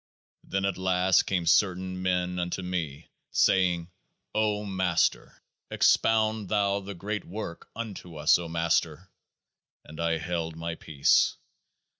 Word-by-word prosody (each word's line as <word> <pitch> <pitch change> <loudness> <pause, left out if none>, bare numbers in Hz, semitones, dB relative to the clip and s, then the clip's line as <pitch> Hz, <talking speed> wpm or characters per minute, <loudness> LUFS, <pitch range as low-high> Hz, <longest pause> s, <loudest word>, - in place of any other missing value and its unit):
Then 95 0 -2
at 100 -2 -2
last 95 0 +3
came 90 -3 0
certain 95 +1 +2
men 90 -1 0
unto 90 +1 -3
me, 80 -5 -4 0.2
saying: 90 -2 +2 0.4
O 105 -1 0
Master! 95 -3 0 0.3
Expound 110 -2 +2
thou 100 -1 +1
THE 100 0 -8
GREAT 105 +4 -4
WORK 90 -3 -7
unto 100 -7 -7
us, 75 +3 +4
O 85 -1 -6
Master! 85 +1 -1 0.7
And 75 - -12
I 85 0 +1
held 80 -1 -3
my 85 +1 -4
peace. 75 -4 +2
90 Hz, 125 wpm, -27 LUFS, 85-100 Hz, 0.7 s, us